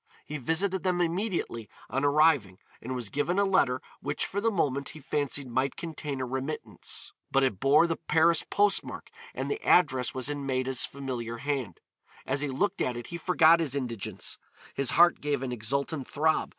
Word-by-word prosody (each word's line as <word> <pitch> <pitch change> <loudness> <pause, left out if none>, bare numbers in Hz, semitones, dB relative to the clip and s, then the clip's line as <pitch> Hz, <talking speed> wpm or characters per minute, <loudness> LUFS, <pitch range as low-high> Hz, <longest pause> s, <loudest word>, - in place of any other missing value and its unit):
He 150 0 -5
visited 180 +8 0
them 180 -2 0
immediately 175 - -2 0.2
on 135 +2 -2
arriving 145 - +3 0.2
and 130 +3 -4
was 120 -5 -5
given 170 +6 0
a 200 - +4
letter 160 -10 +2 0.2
which 145 +1 -1
for 200 - -2
the 230 - +3
moment 140 -9 0
he 155 - -9
fancied 145 -1 -1
might 130 +2 0
contain 150 -4 -5
a 130 - -1
remittance. 135 +4 -4 0.2
But 135 0 +3
it 110 -8 0
bore 140 +6 +5
the 165 -1 -1
Paris 165 0 +3
postmark 205 0 0 0.2
and - - -3
the 425 - -3
address 130 -8 +3
was 130 -1 -1
in 145 -1 -3
Maida's 130 -1 0
familiar 125 -4 -5
hand. 135 - -3 0.4
As 135 +1 0
he 150 - 0
looked 180 +9 -1
at 125 -1 0
it 120 - -7
he - - -2
forgot 170 -1 +5
his 145 -5 0
indigence, 120 -7 -3 0.3
his 140 -3 +2
heart 175 +7 +5
gave 145 -2 -1
an 130 - -3
exultant 135 +5 -2
throb. 155 +2 +1
140 Hz, 180 wpm, -28 LUFS, 130-165 Hz, 0.4 s, bore